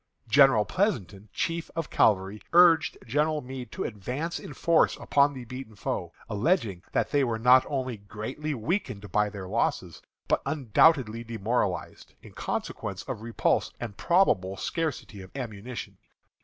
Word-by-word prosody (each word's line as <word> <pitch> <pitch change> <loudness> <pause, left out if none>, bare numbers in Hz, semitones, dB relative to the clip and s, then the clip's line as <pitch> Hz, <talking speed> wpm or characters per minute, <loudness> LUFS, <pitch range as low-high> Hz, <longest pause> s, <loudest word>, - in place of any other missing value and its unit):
General 135 -3 +6
Pleasonton, 105 - -1
chief 165 0 -2
of 165 -2 -3
cavalry, 100 0 +2
urged 165 -4 +6
General 150 +5 +1
Meade 130 -1 -8
to 190 - -4
advance 125 - -4
in - - -9
force 165 +4 +2
upon 140 0 +2
the 125 -2 -7
beaten 125 -2 -8
foe, 90 -3 -3 0.2
alleging 105 - 0
that - - 0
they 145 -2 +3
were 115 -3 0
not 125 +3 +6
only 130 -4 -2
greatly 110 +9 -5
weakened 120 - -3
by 105 0 +2
their 100 -2 -7
losses, 90 -6 -1 0.3
but - - +2
undoubtedly 130 -4 +3
demoralized, 110 -5 -2
in - - -12
consequence - - -4
of - - -6
repulse 115 0 0
and 115 -4 -6
probable 100 - +2
scarcity 150 - -3
of 95 - -11
ammunition. 120 -2 -6
120 Hz, 140 wpm, -27 LUFS, 105-150 Hz, 0.3 s, General